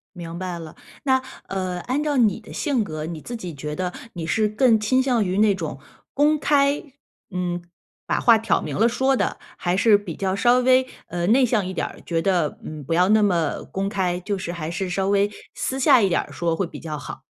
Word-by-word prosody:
明 170 -1 -7
白 180 -2 -4
了， 160 -2 -9 0.3
那 260 -2 +3 0.3
呃， 185 -2 -3
按 270 +4 -1
照 295 -2 0
你 220 -6 +3
的 220 - -14
性 275 -7 0
格， 155 -4 -5
你 160 -2 -6
自 240 - -6
己 180 -7 -6
觉 150 +1 -5
得， 180 0 -3 0.2
你 170 -3 -5
是 215 +6 +2
更 225 +1 +4
倾 255 +5 +2
向 250 -4 +2
于 185 0 -1
那 210 -1 +5
种， 165 -7 -5 0.3
公 295 +2 +3
开 285 0 +2 0.5
嗯， 175 -1 -2 0.5
把 - - +1
话 230 -2 +6
挑 220 -3 +1
明 150 -3 -4
了 225 +3 +4
说 265 +3 +2
的？ - - -1 0.2
还 175 +1 0
是 210 +1 +6
比 195 -6 -7
较 190 -1 -1
稍 240 +4 +4
微， 255 +1 +4 0.2
呃， 175 0 -2
内 255 +5 +5
向 220 -5 +1
一 185 - -4
点 - - -1
儿， - - -12
觉 165 -1 -1
得， 175 -5 +1
嗯， 155 -1 -7
不 155 +5 -2
要 180 +3 +3
那 215 0 +5
么 175 -7 +1
公 195 +1 -1
开， 185 -3 -1
就 200 +2 -2
是 175 -2 -4
还 165 -2 -5
是 185 +2 -3
稍 190 +1 -1
微， 200 0 +3 0.2
私 265 - -3
下 255 -2 +6
一 195 - +3
点 175 - +2
儿 - - -12
说 170 -1 -1
会 195 - -1
比 - - -9
较 155 -2 -5
好？ - - -8
195 Hz, 245 characters per minute, -23 LUFS, 175-235 Hz, 0.5 s, 话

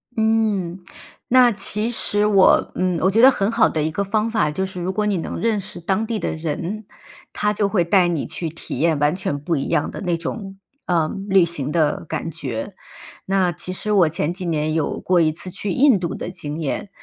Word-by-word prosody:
嗯， 220 -5 0 0.5
那 250 -1 +5
其 210 +2 +1
实 205 -3 +2
我， 200 -3 +4
嗯， 180 -1 0
我 190 - +3
觉 225 +3 +3
得 260 - +9
很 205 -5 0
好 230 -1 +4
的 155 - -1
一 155 - -1
个 200 +6 -1
方 215 +3 0
法 215 -9 +1
就 190 +6 -2
是 185 -1 -7
如 180 +2 -2
果 210 +1 0
你 205 -2 0
能 165 - -5
认 225 -2 +1
识 180 - -5
当 195 +6 -1
地 230 -1 -2
的 - - -2
人， 170 +7 -4 0.5
他 210 - 0
就 205 -1 0
会 195 -4 +2
带 180 +1 +3
你 170 -4 -1
去 165 - -4
体 165 - -6
验 160 -1 +2
完 145 +1 +2
全 185 -6 -3
不 165 +4 -1
一 135 - -2
样 150 - 0
的 - - -7
那 175 -3 -1
种， 195 +3 -6 0.3
呃， 165 -3 +1 0.2
旅 195 -2 +5
行 150 -4 -2
的 155 -2 0
感 165 - -4
觉。 140 - -5 0.5
那 190 -2 +1
其 180 +2 -4
实 210 +3 -3
我 190 -5 +5
前 160 0 -1
几 180 +1 -6
年 155 -2 -1
有 160 -2 -1
过 180 -1 +2
一 160 -2 +3
次 175 +3 -2
去 200 +2 -4
印 260 -1 +4
度 170 -2 -3
的 - - -5
经 150 -5 -5
验， 155 +6 -3
185 Hz, 235 characters per minute, -21 LUFS, 165-210 Hz, 0.5 s, 得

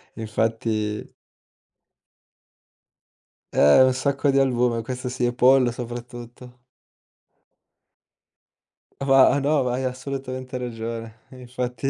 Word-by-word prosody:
Infatti 110 -1 -2 2.4
Eh, 75 - +6
un 130 0 +3
sacco 140 +1 0
di 135 - +1
albume, 125 -3 +1
questo 125 +1 -5
sì, 125 -1 -2
e 120 - 0
pollo 125 0 +4
soprattutto. 120 +1 -9 2.4
Va 135 0 +4
no, 145 0 +1
vai 125 +1 -2
assolutamente 130 0 -5
ragione. 115 -2 -6
Infatti 125 0 -5
125 Hz, 85 wpm, -23 LUFS, 115-130 Hz, 2.4 s, Eh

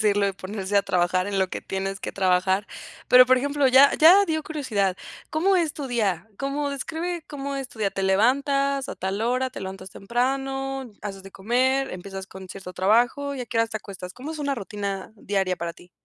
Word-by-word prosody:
decirlo, 205 -1 +3
y - - -2
ponerse 195 +1 -3
a 200 - +5
trabajar 185 0 +1
en 200 -1 -1
lo 190 -1 +2
que - - -5
tienes 195 +1 -4
que - - -5
trabajar. 190 +1 +2 0.4
Pero, 250 0 +9
por 255 0 +5
ejemplo, 285 +1 +1
ya 270 +2 +7
ya 365 +6 +8
dio 315 -1 -1
curiosidad, 215 -12 -1 0.3
¿cómo 370 +5 +2
es 330 -4 +1
tu 285 -3 -5
día? 220 -4 -1
¿Cómo? 280 +1 -2
Describe 320 +4 -4
cómo 280 -1 -5
es 270 -2 -4
tu 225 - -16
día. 200 -2 +1
¿Te 195 - -4
levantas 275 +7 +2
a - - -4
tal 190 +2 -3
hora? 255 +2 0
¿Te 250 - -8
levantas 190 0 -7
temprano, 270 +3 -2
haces 195 -2 -6
de 195 - -11
comer, 260 +7 +1
empiezas 190 +1 -7
con 190 -1 -11
cierto 185 -1 -8
trabajo? 240 +9 +2
¿Y 260 - -5
a 245 - -5
qué 230 - -2
hora 230 - +4
te 220 - -5
acuestas? 190 -3 -8
¿Cómo 275 +8 -7
es 315 - -7
una 285 -2 -1
rutina 200 -2 -5
diaria 195 -3 -1
para 170 0 -4
ti? 175 +1 -18
225 Hz, 210 wpm, -25 LUFS, 195-275 Hz, 0.4 s, Pero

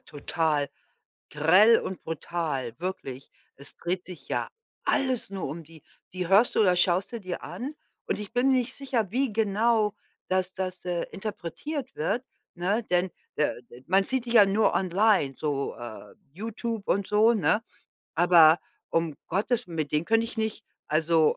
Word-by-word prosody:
total 150 -1 -1 0.6
grell 185 +10 +6
und 190 - -6
brutal, 155 -6 -3
wirklich. 140 -7 -5 0.3
Es 140 +1 -11
dreht 180 +1 -3
sich 180 -2 -11
ja - - -1 0.4
alles 260 -7 0
nur 195 -2 -4
um 160 +4 -6
die. 160 0 -16 0.3
Die 180 -1 -2
hörst 200 +6 +5
du - - +5
oder 185 -4 +5
schaust 180 +3 +2
du 235 - -4
dir 185 -2 -5
an 275 +5 -6 0.3
und - - -1
ich 210 - -7
bin 245 +2 +2
nicht 255 -1 +1
sicher, 245 -8 -1
wie 260 -1 +1
genau 215 0 +2 0.3
das 185 0 0
das, 185 -1 -4
äh, 175 -1 -1
interpretiert 220 - -5
wird, 230 +11 -1 0.3
ne, 195 +6 0
denn 180 +1 +2 0.3
der 150 - 0
de 120 +1 -16
man 195 +2 +4
sieht 260 +1 -1
die 235 - -2
ja 215 -4 +8
nur 205 +3 +2
online, 190 -5 +2
so, 145 -2 -2
äh, 120 -2 -9 0.2
YouTube 225 +3 -5
und 200 0 +1
so, 215 +3 +4
ne? 210 +2 +2 0.5
Aber 170 -1 +7 0.3
um 165 -3 0
Gottes 220 +6 0
mit 160 -4 -3
denen 150 +2 +1
könnte 225 0 +3
ich 230 - -8
nicht, 220 0 -2 0.2
also 160 0 +3
185 Hz, 165 wpm, -27 LUFS, 165-220 Hz, 0.6 s, ja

